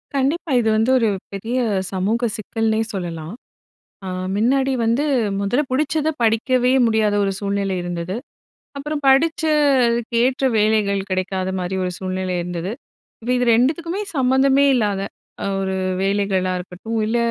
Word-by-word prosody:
கண்டிப்பா. 295 +5 0
இது 220 - +1
வந்து 225 +4 +2
ஒரு 225 -2 +2 0.2
பெரிய 225 +6 -3 0.3
சமூக 210 +6 0
சிக்கல்னே 220 +1 -1
சொல்லலாம். 170 -3 -5 0.7
அ - - -5 0.3
முன்னாடி 265 +5 +2
வந்து 235 +5 +2 0.4
முதல்ல 200 +9 +1
புடிச்சத 305 +3 +1
படிக்கவே 245 +3 +2
முடியாத 220 -2 +2
ஒரு 195 - 0
சூழ்நிலை 200 -1 -1
இருந்தது. 175 +1 -4 0.6
அப்பறம் 295 +1 -4
படிச்சதுக்கேற்ற 265 -5 +2
வேலைகள் 210 -2 +2
கிடைக்காத 185 0 -1
மாரி 180 +1 -3
ஒரு 180 - -2
சூழ்நிலை 185 -1 -3
இருந்தது. 175 +2 -4 0.5
இப்ப 235 +2 -4
இது 250 - +1
2த்துக்குமே 325 - +1 0.2
சம்மந்தமே 265 +1 +3
இல்லாத 205 -5 0 0.6
ஒரு 190 0 -2 0.3
வேலைகளா 195 -2 0
இருக்கட்டும், 185 +5 -5
இல்ல 225 +2 0
225 Hz, 120 wpm, -21 LUFS, 195-265 Hz, 0.7 s, சம்மந்தமே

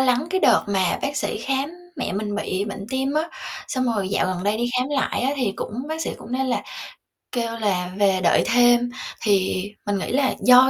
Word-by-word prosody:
lắng 255 +2 +3
cái 375 +1 +1
đợt - - +5
mà 190 -3 +1
bác 285 +1 -1
sĩ 290 - -1
khám 270 +5 -1 0.3
mẹ - - -2
mình 205 +1 -2
bị 200 -2 -1
bệnh 200 -1 -6
tim 265 +2 0
á. 305 - +3 0.5
Xong 255 -2 0
rồi 200 -3 -1
dạo - - +1
gần 185 0 -2
đây 205 +1 +2
đi 240 +1 -1
khám 255 - 0
lại 275 -2 0
á 265 - +2
thì 245 -7 0
cũng - - -5
bác 315 +1 -3
sĩ - - -1
cũng 235 - -9
nêu 265 +1 +1
là 255 -2 0 0.7
kêu 230 -2 -1
là 185 -4 0
"về 195 -2 +3
đợi 170 - +4
thêm". 240 0 +5 0.3
Thì 190 -3 +2 0.2
mình 205 -1 0
nghĩ - - -3
là 265 0 +2
do 255 +1 +8
240 Hz, 220 wpm, -23 LUFS, 200-265 Hz, 0.7 s, do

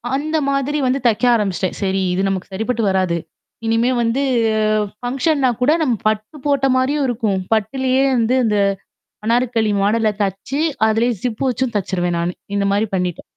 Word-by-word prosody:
அந்தமாதிரி 290 -1 -1
வந்து 260 +2 +1
தைக்க 225 +2 0
ஆரம்பிச்சுட்டேன். 190 -4 -1
சரி 195 0 0
இது 185 - 0
நமக்கு 190 0 -4
சரிப்பட்டு 225 +3 -1
வராது. 185 -3 +1 0.5
இனிமே 230 +2 +2
வந்து 235 +4 0 0.8
ஃபங்ஷன்னா 270 +2 +1
கூட 255 +4 +4
நம்ம 250 -7 +2
பட்டு 215 +7 -2
போட்ட 280 -2 +2
மாதிரியும் 275 +3 +1
இருக்கும். 220 -5 -1
பட்டுலயே 260 +4 +1
வந்து 235 +2 +2
அந்த 210 -1 +1 0.7
அனார்க்கலி 230 -2 +1
மாடல்ல 215 +1 +2
தெச்சு, 200 +9 -2 0.3
அதிலயே 230 +3 +2
ஜிப் 245 0 -2
வச்சும் 250 -1 -1
தச்சுருவேன் 175 -3 -1
நானு. 175 +1 -1 0.2
இந்த 200 - +1
மாதிரி 205 +2 +1
பண்ணிட்டேன். 180 -2 -2
230 Hz, 145 wpm, -19 LUFS, 200-260 Hz, 0.8 s, கூட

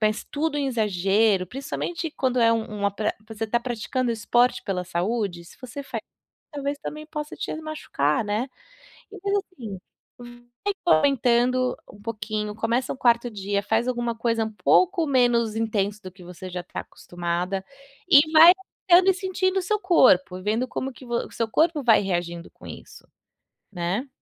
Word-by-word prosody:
mas 215 0 0
tudo 300 0 -2
em 280 - 0
exagero, 205 -3 +2
principalmente, 310 +5 -4
quando 255 -2 0
é 230 0 +5
um 215 -2 -3
um - - +3
atle 200 +2 -1 0.2
você 220 0 -8
está 235 +2 +1
praticando 245 +1 -2
esporte 240 +3 +2
pela 185 -3 -2
saúde, 180 0 -2
se - - -16
você 255 +3 -7
fa - - -5 0.5
talvez 285 0 -3
também 305 +1 -7
possa 300 -1 -6
te - - -4
machucar, 265 - -1
né. 215 +6 -1 0.6
Então, 410 - -10
faz 400 0 +1 0.2
assim, 220 - -7 0.4
vai 240 +9 -7 0.2
aumentando 250 -2 +2 0.2
um 205 - -16
pouquinho, 215 -1 -4
começa 230 +3 -1
o - - -11
4º 240 -1 +3
dia, 200 0 -2
faz 225 +4 +1
alguma 240 -2 -1
coisa 230 -1 0
um 220 - -5
pouco 360 - +3
menos 240 -4 +2
intenso 210 -2 -1
do 185 - -8
que 185 -1 -15
você 180 +1 -9
já 180 0 -5
tá - - -7
acostumada, 175 +2 -4 0.4
e 310 0 +6
vai 330 +3 +9 0.4
aumentando 365 +2 +7
e - - -1
sentindo 375 0 -1
o - - -2
seu 425 +3 0
corpo 255 - +4
e - - -9
vendo 225 +5 0
como 265 +1 -4
que 255 - -14
vo 240 0 -3
o - - -20
seu 230 - -2
corpo 315 +1 +2
vai 225 -3 +5
reagindo 175 -3 -3
com - - -17
isso, - - -11 0.7
né. 190 +9 -2
235 Hz, 175 wpm, -24 LUFS, 205-275 Hz, 0.7 s, vai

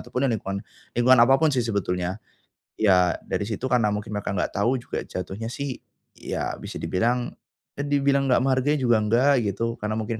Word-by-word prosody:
ataupun 125 - -3
ya 135 - +3
lingkungan 100 -2 -4 0.3
lingkungan 125 0 +6
apapun 135 +6 +5
sih 130 - +2
sebetulnya. 95 -5 -2 0.6
Ya, 90 -4 +4
dari - - -1
situ 115 +4 -3
karena 125 -4 +2
mungkin 105 0 -4
mereka 100 -1 -3
enggak 90 - -1
tahu 120 +6 +1
juga 120 - -5
jatuhnya 95 +4 -6
sih 140 -1 -4 0.4
ya - - -4
bisa - - -8
dibilang, 120 +6 0 0.5
ya - - 0
dibilang 140 -1 +2
enggak 125 - +3
menghargai 135 +2 +2
juga 120 -2 +4
enggak 120 +7 +3 0.2
gitu, 100 +3 -3 0.2
karena 105 +1 -2
mungkin 110 +1 -3
120 Hz, 175 wpm, -24 LUFS, 105-130 Hz, 0.6 s, lingkungan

